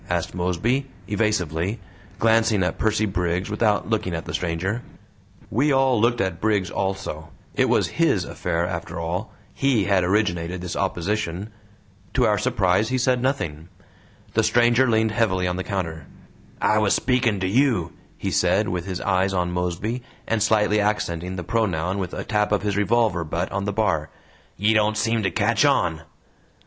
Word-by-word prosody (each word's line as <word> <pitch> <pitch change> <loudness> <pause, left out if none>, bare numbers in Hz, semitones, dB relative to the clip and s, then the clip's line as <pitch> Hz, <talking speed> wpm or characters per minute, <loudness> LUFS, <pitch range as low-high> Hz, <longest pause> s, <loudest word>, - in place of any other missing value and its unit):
asked - - -1
Mosby, 90 +10 0 0.2
evasively, 100 -2 -1 0.4
glancing 110 -3 +3
at 90 - -2
Percy 110 0 +2
Briggs 90 0 -1
without 105 -1 +1
looking 105 -6 -1
at 80 - -5
the - - -6
stranger. 90 +7 -2 0.7
We 140 +7 +2
all 135 -4 +3
looked 120 +1 +2
at 95 -3 -2
Briggs 105 -4 +1
also; 95 -5 -3 0.2
it - - +2
was - - +3
HIS - - +1
affair 85 +1 -2
after 85 -1 -5
all 90 +6 -3 0.2
HE 135 -6 +2
had 95 -2 +2
originated 90 -2 0
this 90 0 -5
opposition. 95 +1 -2 0.6
To 125 - +4
our 105 -2 +2
surprise 105 -3 +1
he 130 - 0
said 125 -1 +2
nothing. 95 - -2 0.6
The - - +3
stranger 120 +2 +4
leaned 110 -1 +2
heavily 105 -5 +1
on 90 0 -2
the 95 - -2
counter. 80 -7 -4 0.5
"I 110 - +3
was 105 -2 +3
speaking 120 -4 +1
to 95 - -1
YOU," 110 - +2 0.2
he - - -3
said, - - +2
with 90 0 -3
his 95 -2 -4
eyes 95 0 +1
on 90 -1 0
Mosby, 90 +7 -2 0.3
and 115 -1 0
slightly 105 -1 +3
accenting 95 -4 -1
the 90 - -4
pronoun 95 -3 0
with 90 -2 -4
a - - -4
tap 105 -1 0
of 105 - +1
his 105 -1 0
revolver 105 -3 +2
butt 85 +3 -3
on 100 +1 -2
the 105 - -1
bar. 110 +1 0 0.5
"Ye 105 +3 +3
don't 105 0 +2
seem 115 +1 +1
to 95 - +1
catch 85 - +2
on." 80 -2 +2
100 Hz, 170 wpm, -23 LUFS, 90-110 Hz, 0.7 s, To